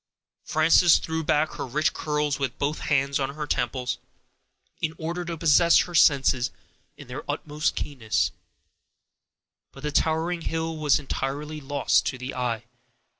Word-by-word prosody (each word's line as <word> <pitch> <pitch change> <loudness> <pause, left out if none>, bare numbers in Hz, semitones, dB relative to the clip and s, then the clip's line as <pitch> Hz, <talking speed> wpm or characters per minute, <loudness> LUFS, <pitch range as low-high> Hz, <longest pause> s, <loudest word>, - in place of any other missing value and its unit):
Frances 160 +2 +5
threw 160 0 -3
back 150 +1 +1
her - - -3
rich 150 +5 +1
curls 150 -1 -1
with 135 -2 -2
both 145 +2 -1
hands 140 -1 +1
on 140 +1 -2
her 150 -1 -3
temples, 125 -3 -2 0.8
in 160 0 -1
order 170 +2 -3
to 170 -1 -5
possess 170 +2 +5
her 175 - -6
senses 135 -5 +4 0.5
in 145 - -12
their 130 +4 -6
utmost 150 +1 -1
keenness; 125 -7 -1 1.4
but 135 - -13
the 150 - -2
towering 165 +3 0
hill 165 0 -2
was 150 -2 +3
entirely 150 +2 -4
lost 140 0 +1
to 125 - -2
the 130 +1 -6
eye. 120 -2 -2
150 Hz, 145 wpm, -25 LUFS, 135-160 Hz, 1.4 s, Frances